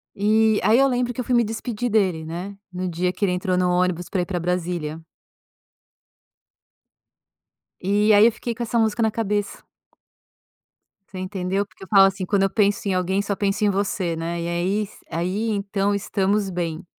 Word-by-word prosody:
E 215 +1 +3
aí 215 +4 +4
eu 275 +1 +5
lembro 245 0 0
que 250 - -3
eu - - -4
fui 255 - -1
me 240 -1 +4
despedir 225 +2 -3
dele, 185 -7 +1
né, 180 +5 -6
no 185 0 -3
dia 180 +2 -1
que 205 - -5
ele 185 - +3
entrou 180 0 0
no 180 0 +2
ônibus 180 -1 0
pra 190 - 0
ir - - -2
pra 175 -1 -3
Brasília. 170 -3 -2 2.8
E 205 +3 +3
aí 205 +1 +7
eu 235 - +3
fiquei 235 +1 -5
com 235 - -9
essa 235 +1 -1
música 225 0 +1
na 220 - +3
cabeça. 210 -2 -2 1.5
Você 190 - -8
entendeu, 185 +1 -2
porque 195 - -16
eu 190 - -10
falo 195 -2 +7
assim, 190 -1 -1
quando 195 +1 +1
eu 195 - +2
penso 205 0 +1
em 190 - +1
alguém 185 +2 0
só 200 0 -2
penso 200 +1 0
em - - +4
você, 190 -3 -1
né, 170 +1 -3
e 170 - -3
aí 180 +5 0
s 205 - -11
aí 185 +7 -2
então 200 0 -1
estamos 200 0 0
bem. 170 -3 -4
195 Hz, 190 wpm, -23 LUFS, 180-210 Hz, 2.8 s, aí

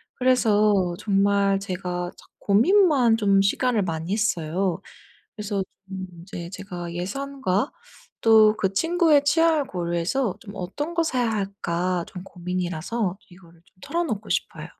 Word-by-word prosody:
그래서 210 -7 +3
정말 200 -1 +2
제가 180 -2 -4
자꾸 - - -19
고민만 255 - +4
좀 200 -2 +3
시간을 225 +2 +1
많이 170 +4 -2
써요. 180 -4 -1 0.6
그래서 210 -2 -2 0.3
좀 190 -1 -6 0.2
이제 170 -1 -7
제가 180 -3 -7
예산과 265 +4 -2 0.5
또 220 -1 +6
그 195 -1 0
친구의 325 - +3
취향을 320 -1 +3
고려해서 175 +6 -1
좀 200 -2 -11
'어떤 290 - -4
거 335 - +2
사야 250 -7 0
할까.' 185 -4 -2
좀 180 -1 -9
고민이라서 180 +3 -3
이거를 170 -2 -18
좀 - - -31
털어 340 - -1
놓고 220 -9 -4
싶어요. - - -2
200 Hz, 275 characters per minute, -24 LUFS, 180-245 Hz, 0.6 s, 또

